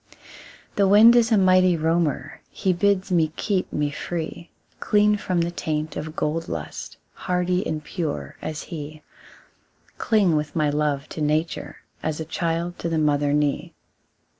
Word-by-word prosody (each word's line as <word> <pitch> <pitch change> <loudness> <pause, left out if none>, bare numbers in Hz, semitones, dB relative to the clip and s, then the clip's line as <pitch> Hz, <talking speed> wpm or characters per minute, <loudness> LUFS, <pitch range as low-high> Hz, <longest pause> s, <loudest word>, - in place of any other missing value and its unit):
The 200 -1 +4
wind 215 +4 +8
is 235 -1 +4
a 220 - +5
mighty 185 -2 +4
roamer; 160 -3 -1
He 190 -2 0
bids 190 +1 +1
me 160 -3 +2
keep 200 -4 -1
me 145 -1 -1
free, 165 +2 -5 0.3
Clean 210 0 +3
from 185 -4 -1
the 170 +1 -1
taint 155 -2 -3
of - - -4
the 160 - -7
gold 160 +1 -2
lust, - - -6 0.2
Hardy 180 0 -1
and 155 -1 -3
pure 110 - -4
as 155 -1 -5
he; 155 -2 -8 1.0
Cling 200 -7 +3
with 150 -1 -2
my 150 -2 +2
love 145 -1 -1
to 155 - -6
nature, 155 +2 -1 0.2
As 155 0 -2
a 160 - -4
child 170 +2 -2
to 170 - -2
the 165 - 0
mother 145 -2 +2
knee. 145 -1 0
165 Hz, 160 wpm, -23 LUFS, 150-185 Hz, 1.0 s, wind